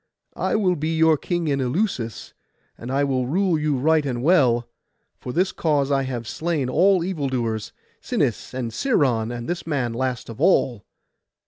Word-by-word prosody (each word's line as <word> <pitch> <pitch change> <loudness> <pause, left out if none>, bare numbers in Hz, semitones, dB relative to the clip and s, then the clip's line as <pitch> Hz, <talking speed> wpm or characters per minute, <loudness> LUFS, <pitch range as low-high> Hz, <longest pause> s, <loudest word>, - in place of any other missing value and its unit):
'I - - -1
will 190 -4 +2
be 160 +1 -2
your 160 0 +5
king 175 +2 -2
in 140 -2 0
Eleusis, 125 - -2 0.4
and 120 - -9
I 140 +1 +1
will 130 -3 0
rule 175 +2 +1
you 150 -2 0
right 155 +3 +3
and 125 -3 -3
well; 130 -8 +3 0.5
for 125 - -6
this 185 +6 +1
cause 145 -3 0
I 135 -1 +2
have 120 -3 -4
slain 155 -4 -2
all 185 +4 +3
evil 165 -7 -2
doers—Sinis, 115 -4 -3
and 125 -3 -4
Sciron, 130 - +1
and 120 -1 -6
this 175 -1 -4
man 130 -7 -1
last 130 +1 -2
of 115 - -9
all. 125 - +2
140 Hz, 165 wpm, -23 LUFS, 125-165 Hz, 0.5 s, your